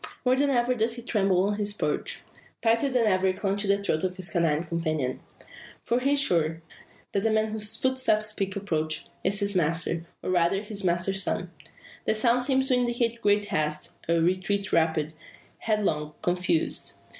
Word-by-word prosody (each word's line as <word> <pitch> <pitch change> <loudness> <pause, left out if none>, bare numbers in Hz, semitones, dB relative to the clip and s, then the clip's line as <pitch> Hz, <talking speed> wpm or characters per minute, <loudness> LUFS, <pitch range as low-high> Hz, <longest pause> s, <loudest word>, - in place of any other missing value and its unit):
More 250 +1 +4
than 280 +2 +2
ever 245 -1 +2
does 230 -1 0
he 240 - -8
tremble 195 -6 +2
on 205 +1 0
his 205 0 0
perch; - - -2 0.4
tighter 230 +4 +3
than 250 -3 +2
ever 190 -2 +3
clutching 200 +1 -1
the 200 - +4
throat 195 -5 -1
of 185 -1 -1
his 185 -2 -3
canine 165 -2 +1
companion. 155 -6 -2 0.6
For 240 - +1
he 275 +3 +2
is 285 - +3
sure, 165 - +1 0.5
that 200 - 0
the 225 - +1
man 220 0 +1
whose 215 0 -2
footsteps 260 -5 +2
speak 195 -2 -3
approach, 160 -6 -2 0.2
is 200 +2 +1
his 200 0 +1
master, 165 0 +1 0.2
or - - -1
rather 180 +3 +2
his 205 -1 -3
master's 185 +2 +1
son. 185 -2 -2 0.5
The 220 - +2
sounds 240 +3 +2
seem 265 -1 +3
to 265 0 +1
indicate 240 -1 0
great 205 0 +3
haste 150 0 -2 0.2
a 170 - +3
retreat 185 +4 0
rapid, 160 -2 +2 0.5
headlong, 155 -9 -1
confused. 175 -2 0
200 Hz, 175 wpm, -27 LUFS, 170-225 Hz, 0.6 s, More